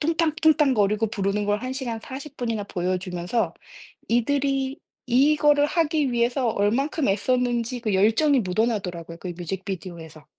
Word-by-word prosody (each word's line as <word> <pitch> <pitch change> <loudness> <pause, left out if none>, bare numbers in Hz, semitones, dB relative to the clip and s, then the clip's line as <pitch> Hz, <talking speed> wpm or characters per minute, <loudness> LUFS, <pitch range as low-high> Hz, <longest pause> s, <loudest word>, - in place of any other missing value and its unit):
뚱탕뚱땅 315 -3 +2
거리고 210 +1 +2
부르는 205 -1 -1
걸 205 +3 0
1 255 - -3
시간 245 -4 -3
40 275 +4 -9
분이나 230 -4 -2
보여주면서 180 +3 -2 0.5
이들이 270 +3 0 0.3
이거를 290 +3 +4
하기 305 -5 +1
위해서 240 +1 +1
얼만큼 260 +9 0
애썼는지 245 +3 0
그 220 -3 -1
열정이 225 +9 +3
묻어나더라고요 185 -5 -2
그 180 - -6
뮤직비디오에서. 175 -3 -6
235 Hz, 335 characters per minute, -24 LUFS, 195-275 Hz, 0.5 s, 이거를